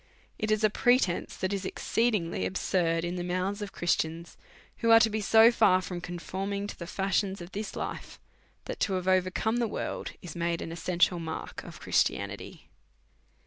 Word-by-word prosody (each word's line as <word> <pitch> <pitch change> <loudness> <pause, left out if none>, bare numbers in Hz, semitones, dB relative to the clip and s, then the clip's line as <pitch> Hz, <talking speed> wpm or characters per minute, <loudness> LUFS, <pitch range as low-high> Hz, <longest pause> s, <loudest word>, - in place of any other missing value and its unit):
It 215 - -1
is 215 0 +2
a 215 - +4
pre 245 +3 +4
tence 175 -8 -2
that 185 +1 -1
is 200 -1 -2
exceedingly 200 - 0
absurd 165 - 0
in 175 +1 -3
the 175 - -3
mouths 185 +3 -2
of 205 -1 -5
Christians, 170 -1 -1 0.4
who 230 - 0
are 225 0 +9
to 225 -1 +3
be 215 0 -1
so 225 +3 +7
far 210 -6 +4
from 180 -1 -5
conforming 190 +3 -4
to 205 - -6
the 170 - -8
fashions 195 +1 0
of 175 +1 -9
this 210 +1 -5
life, - - -6 0.5
that, - - -5
to 195 - +1
have 185 0 -2
overcome 185 +5 +2
the 240 -1 +1
world, - - -4
is 170 -3 -8
made 170 0 -1
an 165 - -6
essential 175 +1 +1
mark 160 -1 -6
of - - -10
Christianity. - - -1
185 Hz, 185 wpm, -29 LUFS, 175-210 Hz, 0.5 s, are